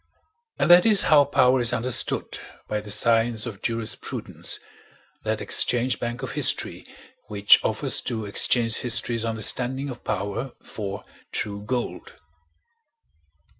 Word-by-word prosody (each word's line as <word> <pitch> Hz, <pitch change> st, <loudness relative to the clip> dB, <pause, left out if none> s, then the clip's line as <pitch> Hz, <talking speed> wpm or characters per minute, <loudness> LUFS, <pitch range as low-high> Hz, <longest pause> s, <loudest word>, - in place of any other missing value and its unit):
And -, -, +2 dB
that 175 Hz, 0 st, +8 dB
is 210 Hz, -3 st, +6 dB
how 145 Hz, -2 st, +5 dB
power 130 Hz, -1 st, +2 dB
is 120 Hz, -, +1 dB
understood 125 Hz, +2 st, 0 dB, 0.3 s
by 105 Hz, 0 st, -3 dB
the 105 Hz, -, -11 dB
science 115 Hz, +1 st, +1 dB
of 110 Hz, -5 st, -8 dB
jurisprudence, 115 Hz, -1 st, -3 dB, 0.6 s
that -, -, -3 dB
exchange 125 Hz, +1 st, 0 dB
bank 120 Hz, +2 st, -5 dB
of 130 Hz, -, -5 dB
history -, -, 0 dB, 0.4 s
which 100 Hz, -1 st, +4 dB
offers -, -, 0 dB
to 110 Hz, -3 st, -4 dB
exchange 115 Hz, +2 st, +2 dB
history's 120 Hz, -1 st, 0 dB
understanding 125 Hz, +5 st, 0 dB
of 125 Hz, -, -11 dB
power 100 Hz, +6 st, -4 dB
for 100 Hz, -2 st, -7 dB, 0.3 s
true 100 Hz, -1 st, -3 dB
gold. 125 Hz, -, -5 dB
120 Hz, 125 wpm, -23 LUFS, 110-130 Hz, 0.6 s, that